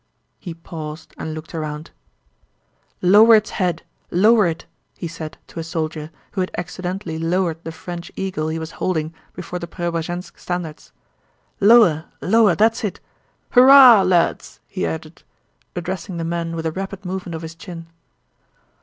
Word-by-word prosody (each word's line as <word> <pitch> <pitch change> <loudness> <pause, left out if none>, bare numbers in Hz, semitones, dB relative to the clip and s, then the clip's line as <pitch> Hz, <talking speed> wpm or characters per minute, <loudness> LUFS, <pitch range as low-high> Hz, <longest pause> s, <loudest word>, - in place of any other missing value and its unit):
He 175 -4 -7
paused 160 -1 -8
and 155 0 -4
looked 155 +2 -9
around. 155 -1 -5 1.1
"Lower 215 +5 +8
its 215 0 +1
head, 175 -4 -1 0.3
lower 210 +2 +4
it!" 165 -1 -4 0.3
he 170 - -4
said 160 -1 -8
to - - -9
a - - -3
soldier 155 -2 -4 0.2
who 190 - -2
had 185 - -1
accidentally 180 -1 -4
lowered 165 0 -1
the 165 - -5
French 170 +1 -8
eagle 185 -5 -3
he 160 +1 -2
was 160 0 -6
holding 160 -3 -1 0.2
before 180 0 -5
the 170 - -6
Preobrazhénsk 175 +1 -4
standards. 175 -4 -5 0.7
"Lower, 200 -7 +6
lower, 210 -2 +4
that's 225 +2 +2
it. 205 - -3 0.5
Hurrah 255 -3 +9
lads!" 180 -2 +1
he 85 - -3
added, 80 0 -6 0.5
addressing 180 +1 -4
the 165 - -3
men 165 0 -3
with 165 0 -4
a 160 - 0
rapid 195 +2 -6
movement 180 -2 -4
of 160 - -7
his 160 0 -7
chin. 165 0 -9
175 Hz, 150 wpm, -21 LUFS, 160-190 Hz, 1.1 s, Hurrah